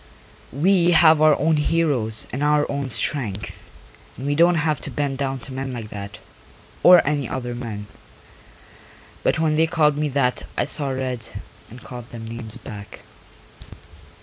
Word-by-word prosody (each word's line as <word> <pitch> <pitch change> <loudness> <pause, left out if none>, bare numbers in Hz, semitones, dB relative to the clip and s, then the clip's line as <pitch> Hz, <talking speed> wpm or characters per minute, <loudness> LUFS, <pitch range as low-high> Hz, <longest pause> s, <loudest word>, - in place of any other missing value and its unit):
We 175 +4 +3
have 160 -1 +6
our 155 -2 +5
own 155 +2 +2
heroes 145 -9 +1
and 130 - -3
our 150 0 +3
own 140 -1 -3
strength 110 -4 -2 0.5
and 130 - -7
we 145 - +1
don't 170 +3 +4
have 155 -3 0
to - - -5
bend 140 -2 -3
down 135 -1 -2
to 130 - -9
men 130 0 -4
like 115 -3 -6
that, 100 -1 -8 0.6
or 180 -1 +7
any 145 -4 -1
other 125 -2 -4
men. 115 -4 -6 1.4
But - - +1
when 155 -1 +1
they 160 +1 +3
called 155 -3 +2
me 150 -1 0
that 130 -2 0 0.2
I - - +1
saw 140 -2 0
red 130 -3 -4 0.4
and 120 +1 -12
called 120 -1 -9
them 115 -1 -9
names 115 -1 -7
back. 105 -5 -10
135 Hz, 160 wpm, -22 LUFS, 120-155 Hz, 1.4 s, or